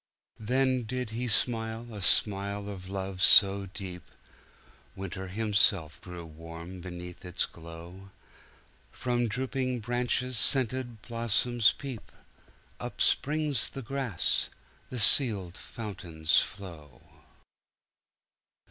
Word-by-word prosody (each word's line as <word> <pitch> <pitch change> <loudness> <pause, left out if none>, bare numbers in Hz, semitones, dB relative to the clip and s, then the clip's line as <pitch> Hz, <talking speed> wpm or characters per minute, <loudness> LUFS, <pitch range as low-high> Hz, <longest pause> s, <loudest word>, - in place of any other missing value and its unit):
Then 130 +3 +1
did 125 0 -4
he 120 +3 -3
smile 115 0 0
a 105 - -7
smile 100 +1 +3
of 95 -2 -8
love 95 -1 -5
so 100 0 +6
deep, 95 -2 -8 0.9
Winter 95 0 -6
himself 100 -5 +1
grew 90 -2 -9
warm 85 +3 -10
beneath 90 0 -9
its 90 -1 -2
glow; 85 +3 -12 0.8
From 120 -1 -1
drooping 130 +1 -2
branches 120 +1 +1
scented 125 -3 +4
blossoms 115 0 +1
peep; 130 -6 -9 0.7
Up - - -7
springs 150 -4 +1
the 135 - -8
grass; 130 -6 0 0.4
the 130 - -6
sealed 100 -5 +5
fountains 85 -10 -1
flow. 80 -9 -8
105 Hz, 100 wpm, -29 LUFS, 90-120 Hz, 0.9 s, so